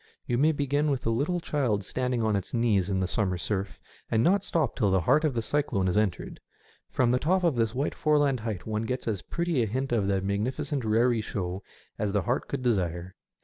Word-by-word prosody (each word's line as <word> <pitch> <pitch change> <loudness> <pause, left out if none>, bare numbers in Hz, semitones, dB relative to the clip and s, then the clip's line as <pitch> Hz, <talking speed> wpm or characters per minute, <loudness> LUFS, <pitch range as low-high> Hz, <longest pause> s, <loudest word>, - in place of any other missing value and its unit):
You 120 0 0
may 155 +3 +4
begin 145 0 0
with 135 -3 0
the 115 - 0
little 150 +10 0
child 125 - 0
standing 125 +3 -1
to 110 - +1
its 100 +4 -3
knees 105 -5 +2
in 95 -1 0
the 95 - 0
summer 95 -2 -1
surf, 100 +2 -3 0.3
and 115 0 +2
not 195 +5 +3
stop 165 -6 0
till 105 -6 +2
the 95 -1 +2
heart 150 - +3
of 150 -5 +1
the 115 - -1
cyclone 115 -8 0
is 90 - 0
entered. 105 -4 -1 0.5
From 120 -2 +2
the 125 - +2
top 185 +6 +1
of 170 -6 +2
this 115 0 0
white 140 +3 -1
foreland 145 -4 +2
height 110 -5 -4
one 110 0 -2
gets 125 +1 -3
as 105 -5 -1
pretty 170 -6 -1
a 115 - +1
hint 130 +5 -2
of 110 -5 +1
the 100 -1 +1
magnificent 125 +9 -2
raree 115 +1 +2
show 95 -3 -4 0.4
as 105 -2 -1
the 100 - +1
heart 120 +3 -1
could 135 -2 -4
desire. 90 -6 -1
115 Hz, 225 wpm, -27 LUFS, 100-140 Hz, 0.5 s, may